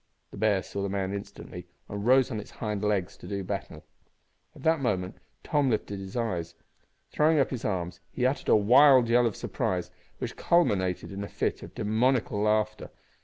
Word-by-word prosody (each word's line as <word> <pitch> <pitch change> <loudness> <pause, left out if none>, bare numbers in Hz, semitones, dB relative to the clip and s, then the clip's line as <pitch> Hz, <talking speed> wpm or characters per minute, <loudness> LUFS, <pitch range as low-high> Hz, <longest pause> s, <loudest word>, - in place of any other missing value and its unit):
The - - -10
bear 100 -2 +2
saw 100 - -5
the 100 - -2
man 95 0 -2
instantly, 100 -3 -8 0.2
and 100 0 -5
rose 130 +2 +4
on 110 - -2
its 105 - -9
hind 105 -3 -4
legs 100 -4 0
to - - -11
do 100 -1 -3
battle. 95 -5 -5 0.7
At - - -13
that 160 0 +3
moment 95 -8 -1 0.3
Tom 145 -2 +1
lifted 105 -3 -2
his 95 +4 -7
eyes. 85 -8 -2 0.6
Throwing 155 +1 +3
up 135 - +2
his 125 -4 -4
arms, 90 -3 -2
he 125 - -1
uttered 130 +1 0
a - - +7
wild 125 +3 +6
yell 120 0 +4
of 110 - -3
surprise, - - -2 0.3
which - - -5
culminated 95 - +1
in 100 +1 -5
a - - -5
fit - - -2
of - - -11
demoniacal 110 0 +1
laughter. 110 0 0
105 Hz, 185 wpm, -28 LUFS, 100-125 Hz, 0.7 s, a